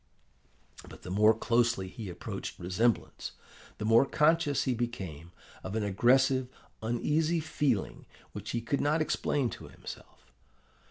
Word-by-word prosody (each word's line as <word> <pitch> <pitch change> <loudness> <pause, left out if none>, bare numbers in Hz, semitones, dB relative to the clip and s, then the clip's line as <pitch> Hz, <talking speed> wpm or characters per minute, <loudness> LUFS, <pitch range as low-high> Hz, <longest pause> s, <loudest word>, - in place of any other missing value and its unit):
"But - - -13
the 90 - -7
more 105 +3 +5
closely 115 -4 +1
he 105 +1 -7
approached 90 - -6
resemblance, 105 +7 -1 0.4
the 105 - -4
more 115 +3 +6
conscious 150 -1 +3
he 130 - +1
became 95 -10 -5 0.3
of 95 +3 -5
an 110 - 0
aggressive, 130 +6 +3 0.3
uneasy 150 +9 +1
feeling 150 -8 -1 0.2
which 105 +1 -7
he 120 - -1
could 125 +5 -1
not 150 +2 +2
explain 140 -4 0
to - - -9
himself. - - -12
120 Hz, 130 wpm, -30 LUFS, 105-140 Hz, 0.4 s, more